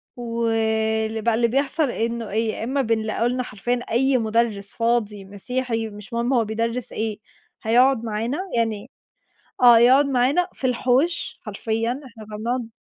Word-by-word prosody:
ول 220 -2 0
بقى 230 0 +2
اللي 235 +1 +2
بيحصل 275 +4 0
إنه 230 -1 -3
إيه، 220 +2 0
يا - - -5
إما 270 +4 0
بنلاقوا 225 0 0
لنا 250 +1 -1
حرفيًا 240 +3 -2
أي 265 +3 +3
مُدرّس 220 -3 -1
فاضي 230 -4 0
مسيحي، 225 +3 -3
مش 210 +1 -11
مهم 235 +3 0
هو 230 -3 +3
بيدرّس 230 +3 -2
إيه، 220 -1 -3 0.4
هيقعد 245 +2 +4
معانا، 225 +5 -2 0.2
يعني 225 0 -1 0.7
آه 240 -2 +8
يقعد 260 +4 +6
معانا 275 +6 +2
في 260 - -2
الحوش 280 +5 0
حرفيًا 225 +2 -2
إحنا 225 -3 -12
كنا 210 0 -8
بنقعد 235 +1 -2
230 Hz, 150 wpm, -23 LUFS, 220-250 Hz, 0.7 s, آه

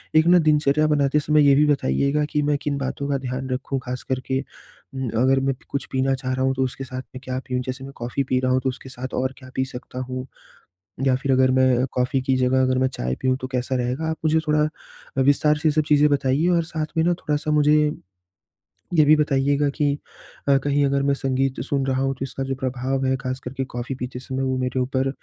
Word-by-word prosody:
एक 155 0 +6
ना 180 +1 +7
दिनचर्या 155 -1 +3
बनाते 145 -1 +2
समय 150 0 +3
ये 140 - +7
भी 150 +2 +5
बताइएगा 140 - +1
कि 150 - +1
मैं 145 0 +1
किन 145 -1 -1
बातों 140 +1 -3
का 140 - +1
ध्यान 130 0 -4
रखूँ, 130 +1 -2
ख़ास 125 0 -4
करके 130 0 -1
उम, 130 -2 -9
अगर 135 +1 +4
मैं 135 0 0
कुछ 140 - -3
पीना 135 0 +1
चाह 130 -1 -3
रहा 130 0 0
हूँ 135 - +2
तो 130 - +1
उसके 130 +1 -4
साथ 130 -1 -6
में 130 - -7
क्या 130 0 -3
पीऊँ? 125 0 -1
जैसे 130 +1 -5
मैं 135 +1 -9
कॉफ़ी 120 +3 -2
पी 130 -1 0
रहा 130 0 0
हूँ 130 - +3
तो 130 - +1
उसके 130 +1 -8
साथ 130 0 -7
और 130 +1 -1
क्या 130 -2 -13
पी 130 - +1
सकता 125 -1 -8
हूँ? 130 0 -4 0.8
या 130 - +4
फिर 135 +1 -1
अगर 130 0 +4
मैं 130 -1 +3
कॉफ़ी 125 +2 0
की 130 0 +1
जगह 130 +1 +2
अगर 130 0 +2
मैं 130 0 +2
चाय 65 - -3
पियूँ 130 0 +1
तो - - -2
कैसा 125 +1 -1
रहेगा? 125 +6 -1
आप 160 - -2
मुझे 160 0 +3
थोड़ा 150 0 +3 0.6
अ, - - +4
विस्तार 145 +3 +3
से 155 +1 +1
ये - - +3
सब 155 +1 +2
चीज़ें 150 0 +5
बताइए 140 +3 +2
और 170 - +2
साथ 160 -1 -3
में 160 - +3
ना 175 +1 +3
थोड़ा-सा 150 -2 -2
मुझे, 150 0 +4 1.2
ये 160 -3 +6
भी 155 +1 +7
बताइएगा 145 -1 +2
कि 145 -1 +1 0.5
अ, 140 -1 +5
कहीं 145 0 +2
अगर 140 0 +1
मैं 140 0 +2
संगीत 135 -1 -1
सुन 140 -2 0
रहा 130 -1 0
हूँ 135 0 +1
तो 135 - -4
इसका 135 0 -5
जो 135 0 -2
प्रभाव 130 +1 -2
है 130 0 +2
ख़ास 130 0 -4
करके 135 +2 -3
कॉफ़ी 120 +2 -3
पीते 125 0 -6
समय 130 +1 -4
वो 130 -1 0
मेरे 130 0 -1
ऊपर 130 +1 0
135 Hz, 240 wpm, -23 LUFS, 130-145 Hz, 1.2 s, ना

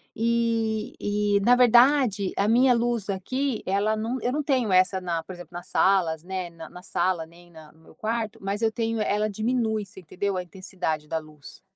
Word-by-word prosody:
e 225 -1 0
e 205 0 +1
na 245 +5 +5
verdade 245 -4 +4
a 200 - +2
minha 250 +3 +5
luz 235 -3 -1
aqui 255 +6 -2
ela 200 +3 +1
num 230 +4 -3
eu 245 - 0
não 295 +3 -1
tenho 255 -7 +1
essa 185 +1 +3
na 170 -2 -2
por 185 - -9
exemplo 175 -1 -12
nas 175 +1 -7
salas, 175 -5 +2
né, 185 -1 -4
na 165 -1 -11
na 180 0 -12
sala 175 -3 -1
nem 175 +2 -18
na 160 -2 -14
no 160 - -25
meu 160 - -19
quarto, 225 +1 -3
mas 200 +3 -3
eu 220 -1 +2
tenho 225 -1 -2
ela 210 0 0
diminui 220 0 -1
você 195 0 -12
entendeu 190 +3 -3
a 180 - -2
intensidade 180 -4 -4
da 160 - -2
luz. 150 -2 -13
205 Hz, 200 wpm, -25 LUFS, 180-230 Hz, -, na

